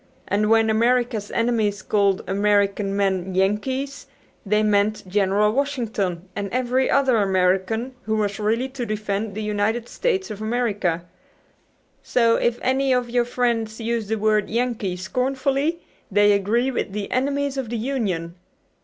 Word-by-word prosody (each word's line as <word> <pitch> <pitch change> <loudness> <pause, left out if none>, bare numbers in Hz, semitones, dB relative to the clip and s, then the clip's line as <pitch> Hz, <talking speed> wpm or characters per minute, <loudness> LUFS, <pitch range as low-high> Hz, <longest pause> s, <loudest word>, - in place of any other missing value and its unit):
And 210 +2 +1
when 225 0 +4
America's 235 -1 +1
enemies 220 -4 0
called 200 -2 +1
American 200 0 +1
men 190 -2 0
'Yankees' 260 +9 -1 0.4
they 210 +1 +1
meant 210 -1 +1
General 205 +2 +2
Washington 225 -9 -2
and 200 -1 -3
every 255 +1 +1
other 265 -4 +3
American 195 +5 +1
who 220 0 0
was 205 -1 -1
ready 225 +5 0
to 265 -2 -5
defend 210 -1 -3
the 215 - -3
United 210 +3 -1
States 390 - -1
of 210 0 -7
America. 210 -7 -1 1.0
So 230 -2 +2
if 240 0 +1
any 265 +1 +1
of 250 -2 +1
your 245 0 +2
friends 235 -3 -1
use 230 -1 -2
the 220 - 0
word 215 -1 +1
'Yankee' 225 -5 -1
scornfully 270 - -1 0.3
they 205 0 +4
agree 220 +6 +1
with 200 - -3
the 205 -1 -4
enemies 280 +1 0
of 265 -4 -3
the 235 - -2
Union. 210 -10 -2
220 Hz, 145 wpm, -23 LUFS, 200-245 Hz, 1.0 s, when